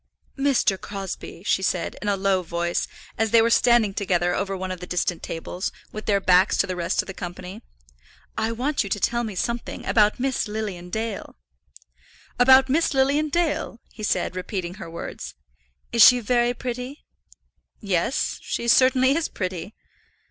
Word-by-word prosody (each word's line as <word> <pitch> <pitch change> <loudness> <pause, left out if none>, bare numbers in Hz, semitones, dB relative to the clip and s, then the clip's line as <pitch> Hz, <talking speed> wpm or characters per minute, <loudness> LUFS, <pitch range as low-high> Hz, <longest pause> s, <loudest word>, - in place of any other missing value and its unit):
"Mr. 270 -9 +1
Crosbie," 195 -3 -7
she 190 - +1
said, 185 -2 -1
in 210 - -4
a 200 -1 +1
low 195 -1 +1
voice, 170 0 -2 0.3
as 225 0 +2
they 230 - +6
were 230 +1 +3
standing 235 -4 +4
together 180 -3 0
over 195 0 -2
one 185 0 -4
of 185 - -5
the 180 - -8
distant 180 -1 -1
tables, 175 +3 -4 0.2
with 215 - -8
their 200 -2 +3
backs 185 -1 +4
to - - +3
the 185 - -4
rest 170 -1 0
of - - -16
the 190 - -7
company, 180 0 -8 0.7
"I 220 +1 -1
want 265 +6 -1
you 200 - -6
to 205 - -1
tell 235 +4 0
me 215 -4 -5
something 235 +5 -3
about 210 0 +3
Miss 260 -2 0
Lilian 205 -5 -5
Dale." 220 +1 -4 1.0
"About 260 +1 +7
Miss 295 +2 +1
Lilian 280 +3 +2
Dale!" 310 -7 -1
he 220 - -11
said, 210 - -1
repeating 185 -1 -4
her 165 - -7
words. 170 - -7 0.6
"Is 235 -1 +6
she 250 -1 +8
very 240 +1 +1
pretty?" 250 +4 -6 0.7
"Yes; 200 - -1
she 235 - -3
certainly 260 +2 +5
is 330 0 0
pretty." 185 +1 -5
210 Hz, 170 wpm, -24 LUFS, 185-245 Hz, 1.0 s, she